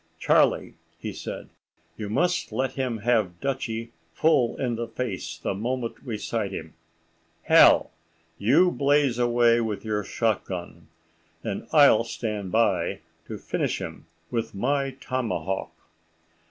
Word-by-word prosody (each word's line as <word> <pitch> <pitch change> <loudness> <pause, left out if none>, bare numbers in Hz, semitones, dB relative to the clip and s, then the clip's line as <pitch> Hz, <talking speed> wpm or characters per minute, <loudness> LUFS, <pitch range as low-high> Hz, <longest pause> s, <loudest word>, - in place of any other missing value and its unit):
"Charlie," - - +2 0.4
said - - -7 0.5
he, - - -11
"you 100 - -4
must 175 +11 0
let 130 0 -1
him 130 -4 -2
have 105 -8 +1
Dutchie 115 -4 -3 0.2
full 135 -7 +3
in 125 -3 -1
the 115 +1 -3
face 115 -4 -4
the - - -2
moment 115 +4 -3
we 115 -5 -4
sight 105 -1 -2
him.—Hal, - - +2 0.5
you 155 - +4
blaze 140 -4 +2
away 120 -1 +4
with 110 -1 -3
your 105 -1 -1
shot 110 -1 0
gun, 85 -2 -7 0.6
and 100 - -4
I'll 140 -8 +6
stand 105 -4 -4
by 115 0 +1 0.3
to - - -5
finish - - -2
him - - -8 0.2
with 115 -3 -2
my 135 +5 0
tomahawk." 115 -7 -2
115 Hz, 125 wpm, -26 LUFS, 105-130 Hz, 0.6 s, I'll